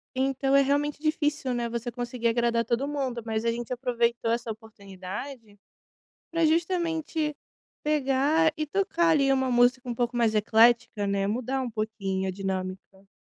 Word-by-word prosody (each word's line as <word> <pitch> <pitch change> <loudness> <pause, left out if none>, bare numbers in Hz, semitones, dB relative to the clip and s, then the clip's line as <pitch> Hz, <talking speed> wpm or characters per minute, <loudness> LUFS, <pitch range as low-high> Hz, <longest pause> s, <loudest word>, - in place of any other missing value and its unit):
Então, 270 +1 0
é 275 - +7
realmente 290 +2 0
difícil, 300 -3 0
né, 240 -1 -2
você 235 +1 -3
conseguir 240 0 -3
agradar 235 0 +1
todo 235 +4 0
mundo 265 -5 -3
mas 220 0 -2
a 230 - +3
gente 235 +1 -5
aproveitou 240 -2 0
essa 235 -1 -1
oportunidade 210 +2 -9 0.7
pra 330 0 +1
justamente 325 -2 0 0.5
pegar 300 +2 +2
e 310 - -1
tocar 345 0 +1
ali, 280 -4 +4
uma 265 -1 +1
música 245 +1 +3
um 240 - -2
pouco 240 +1 -1
mais 230 -2 +2
eclética, 225 0 +3
né, 200 0 0
mudar 255 +5 -1
um 245 - -4
pouquinho 195 -3 -2
a - - 0
dinâmica. 190 0 -5
245 Hz, 155 wpm, -27 LUFS, 225-285 Hz, 0.7 s, é